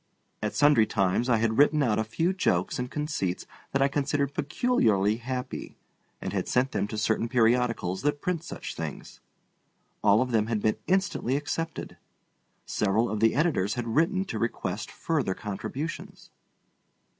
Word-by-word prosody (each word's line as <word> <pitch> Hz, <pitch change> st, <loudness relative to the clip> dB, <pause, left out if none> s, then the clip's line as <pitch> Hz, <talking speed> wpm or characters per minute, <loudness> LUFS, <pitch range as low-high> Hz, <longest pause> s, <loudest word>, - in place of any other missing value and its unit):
At 105 Hz, -1 st, -2 dB
sundry 145 Hz, -7 st, +5 dB
times 100 Hz, +5 st, +1 dB
I 115 Hz, -, +4 dB
had 110 Hz, +2 st, +1 dB
written 150 Hz, +1 st, +5 dB
out 110 Hz, -4 st, +1 dB
a -, -, +2 dB
few 165 Hz, +12 st, 0 dB
jokes 95 Hz, -, 0 dB
and 125 Hz, 0 st, -3 dB
conceits 150 Hz, -, -2 dB, 0.3 s
that 135 Hz, 0 st, +2 dB
I -, -, +4 dB
considered 140 Hz, 0 st, 0 dB
peculiarly 115 Hz, -, +2 dB
happy, 125 Hz, +2 st, -5 dB, 0.4 s
and -, -, -5 dB
had -, -, -1 dB
sent 130 Hz, +2 st, +1 dB
them -, -, -1 dB
to 110 Hz, -, -5 dB
certain 110 Hz, +1 st, 0 dB
periodicals 115 Hz, -5 st, +2 dB
that 145 Hz, 0 st, 0 dB
print 170 Hz, 0 st, -2 dB
such -, -, -6 dB
things. -, -, -7 dB, 0.8 s
All 105 Hz, +3 st, +5 dB
of 125 Hz, -, -5 dB
them 110 Hz, -2 st, +2 dB
had 115 Hz, -2 st, 0 dB
been 110 Hz, +1 st, +1 dB
instantly 185 Hz, -8 st, +1 dB
accepted. 160 Hz, +2 st, -4 dB, 0.7 s
Several 105 Hz, +2 st, +1 dB
of 110 Hz, -, -2 dB
the 115 Hz, +1 st, +3 dB
editors 140 Hz, -, +1 dB
had 120 Hz, -2 st, -3 dB
written 165 Hz, -, +2 dB
to -, -, -4 dB
request 115 Hz, -, -2 dB
further 145 Hz, -, -1 dB
contributions. 115 Hz, +10 st, -6 dB
125 Hz, 155 wpm, -27 LUFS, 110-145 Hz, 0.8 s, sundry